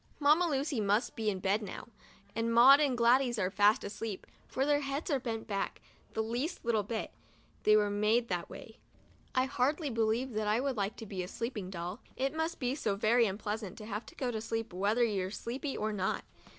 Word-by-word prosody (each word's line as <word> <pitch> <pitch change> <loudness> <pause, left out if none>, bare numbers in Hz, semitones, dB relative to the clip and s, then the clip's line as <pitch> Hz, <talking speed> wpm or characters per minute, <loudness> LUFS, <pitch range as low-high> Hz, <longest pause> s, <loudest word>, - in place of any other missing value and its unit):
Mamma 305 +4 +5
Lucy 275 -4 0
must 210 +4 +1
be 220 -1 0
in 195 - -1
bed 195 +3 +1
now, 205 - -7 0.5
and 230 +1 0
Maud 255 +5 +8
and 280 -5 +2
Gladys 240 +1 +4
are 185 -2 0
fast 205 +4 +4
asleep, 210 -1 -5 0.2
for 265 - -1
their 290 0 +3
heads 280 +4 -3
are 275 - +2
bent 225 -3 -4
back 200 -3 -3 0.3
the 220 - 0
least 245 +10 -3
little 230 -2 +2
bit 220 +2 -4 0.3
— - - -33
they 215 - +7
were 205 -1 +2
made 215 +3 +2
that 175 -4 -3
way. 220 - -11 0.6
I 255 0 +3
hardly 280 +3 0
believe 230 +3 0
that 215 0 -1
I 215 +2 +3
would 270 0 -1
like 200 -1 -1
to 225 - -8
be 195 -3 -4
a 180 - -4
sleeping 210 -2 -4
doll 180 +3 -5
— - - -29
it 275 - -1
must 320 +1 -2
be 250 -1 0
so 215 -8 -1
very 225 +3 +3
unpleasant 205 0 -4
to 215 - -8
have 210 +1 -5
to - - -13
go 255 -2 -2
to 220 -2 -3
sleep 225 -2 -3
whether 205 +6 +2
you're 195 -5 0
sleepy 260 +7 -4
or 215 0 -1
not. 190 -2 -1
225 Hz, 215 wpm, -32 LUFS, 205-260 Hz, 0.6 s, Maud